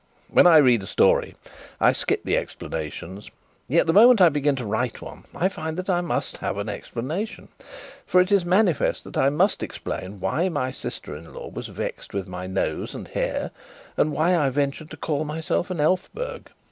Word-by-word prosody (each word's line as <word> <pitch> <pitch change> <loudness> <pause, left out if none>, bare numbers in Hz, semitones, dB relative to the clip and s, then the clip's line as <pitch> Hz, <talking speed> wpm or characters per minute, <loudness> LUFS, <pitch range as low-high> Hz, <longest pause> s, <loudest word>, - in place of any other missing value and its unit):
When - - +6
I 165 -2 +8
read 125 -7 +5
a 95 - -8
story, - - +2 0.4
I - - +5
skip - - -1
the - - +2
explanations; 80 +5 -5 0.4
yet 165 +6 +3
the 165 - +2
moment 235 +3 +7
I 180 -2 +8
begin 145 -1 +1
to 125 -3 -5
write 110 +4 -2
one, - - -11
I 180 - +2
find 160 -3 -5
that 185 +1 -1
I 175 -1 +2
must 175 - -3
have - - -3
an 100 +1 -3
explanation. 145 - -5 0.6
For 180 - +4
it 180 +2 +3
is 200 -3 +4
manifest 185 0 +2
that - - -11
I 135 - +3
must 180 +8 +1
explain 95 +2 -5
why 170 - 0
my 135 -6 -2
sister 75 - -6
in 80 +2 -11
law - - -8
was - - -6
vexed - - -6
with 100 -1 -2
my 90 0 -6
nose 95 - -2
and - - -8
hair, - - -2 0.4
and 155 - +2
why 160 +5 +2
I 150 -5 +2
ventured 140 +3 -2
to 160 - -9
call 150 -1 -1
myself 160 +4 -2
an 180 -3 -4
Elphberg. 445 - -1
155 Hz, 195 wpm, -24 LUFS, 120-180 Hz, 0.6 s, I